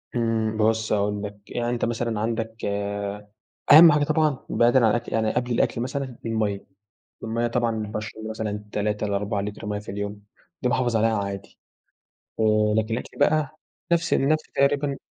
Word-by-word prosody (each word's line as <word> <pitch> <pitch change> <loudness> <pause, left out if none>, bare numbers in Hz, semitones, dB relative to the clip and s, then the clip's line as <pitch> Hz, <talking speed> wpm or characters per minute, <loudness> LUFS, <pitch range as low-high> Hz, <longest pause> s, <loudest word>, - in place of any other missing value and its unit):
إمم، 110 -2 0
بُص 110 0 +1
هاقول 105 0 0
لك، 105 0 -6
يعني 120 0 -1
أنت 120 -1 0
مثلًا 115 -2 -2
عندك 115 0 -3 1.1
أهَم 160 +2 +10
حاجة 150 0 +3
طبعًا 155 -2 +1
بعيدًا 120 +2 +4
عن - - +5
الأكل 120 +1 -2
يعني 110 -1 +1
قبل 125 0 -1
الأكل 115 0 +1
مثلًا، 130 -1 -4
المَيَّة. 110 -3 -1 0.6
المَيَّة 115 +1 -1
طبعًا 120 0 0 0.2
باشرب 110 +1 -6
مثلًا 105 -1 -4
3 105 0 -1
ل4 100 0 -1
لِتْر 105 +1 -6
مَيّة 105 0 -2
في 105 - -17
اليوم، 100 +1 -5 0.4
دي 125 - +2
باحافظ 120 -2 +1
عليها 110 0 +2
عادي. 100 0 -7 0.8
آآ 105 -1 +3
لكن 110 +1 0
الأكل 120 - -7
بقى 155 0 +2 0.4
نَفْس 170 0 +2
نَفْس 155 +3 +2
تقريبًا 140 0 +1
115 Hz, 160 wpm, -24 LUFS, 105-125 Hz, 1.1 s, أهَم